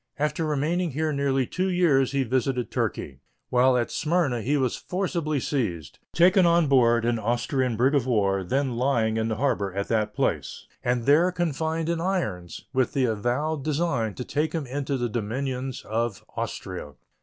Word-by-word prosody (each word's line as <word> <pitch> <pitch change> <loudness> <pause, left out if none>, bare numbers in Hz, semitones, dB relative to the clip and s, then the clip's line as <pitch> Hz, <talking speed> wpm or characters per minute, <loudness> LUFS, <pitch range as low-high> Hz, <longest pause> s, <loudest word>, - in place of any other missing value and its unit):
After 150 +2 -1
remaining 155 +3 0
here 155 +2 -1
nearly 135 -2 +1
two 185 +9 -1
years 155 -8 +3
he 140 -1 +1
visited 125 0 -1
Turkey. 65 -1 -3 0.3
While 125 +1 +4
at 120 - -1
Smyrna 155 -7 0
he 145 +7 +1
was 130 -3 0
forcibly 170 -5 -2
seized, 110 - -3
taken 180 +3 +5
on 170 -1 +4
board 120 -4 +4
an 120 -1 +1
Austrian 120 +2 0
brig 130 +5 +3
of 135 -4 +1
war 100 -5 +1
then 130 +4 -1
lying 115 -4 +1
in 110 0 0
the 110 - -1
harbor 120 -7 0
of 100 +1 -4
that 110 -2 0
place, - - -2 0.2
and 120 -1 0
there 160 +6 +5
confined 165 -2 -1
in 170 -1 -1
irons, 110 - -3
with 130 -2 +1
the 135 -2 +2
avowed 125 +7 -1
design 140 - -1
to 125 - -5
take 150 +2 -1
him 160 -4 -2
into 140 +1 -2
the 120 -1 -1
dominions 125 +3 -3
of 110 -1 -2
Austria. 75 - -5
130 Hz, 170 wpm, -25 LUFS, 115-155 Hz, 0.3 s, taken